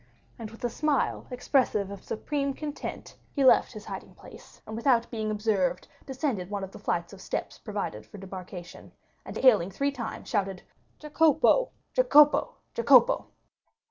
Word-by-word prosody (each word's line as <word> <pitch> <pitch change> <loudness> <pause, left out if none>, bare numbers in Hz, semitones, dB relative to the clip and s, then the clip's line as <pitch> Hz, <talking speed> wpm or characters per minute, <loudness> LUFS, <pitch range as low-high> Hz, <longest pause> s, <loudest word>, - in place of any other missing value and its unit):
20064m - - -32 0.3
And 225 -2 -6
with 225 +2 -14
a 240 - +1
smile 300 +2 0
expressive 250 -5 0
of 200 -1 -9
supreme 275 +3 -2
content, 300 0 -6 0.2
he 275 -2 +2
left 255 - +5
his 215 -1 -9
hiding - - -8
place, - - -15
and 220 - -7
without 235 0 +2
being 220 -2 -2
observed, 205 -4 0 0.2
descended 260 - -2
one 205 -1 -3
of 190 - -6
the - - -11
flights 170 +2 -2
of 190 - -12
steps - - -4
provided 200 - -5
for - - -12
debarkation, 185 -2 -9 0.3
and - - -6
hailing 215 -9 +5
three 280 +9 -1
times, 240 -5 -6
shouted 195 -4 -2 0.3
"Jacopo, 310 - +3 0.2
Jacopo, 300 -13 +5 0.2
Jacopo!" - - +5
225 Hz, 155 wpm, -28 LUFS, 195-280 Hz, 0.3 s, left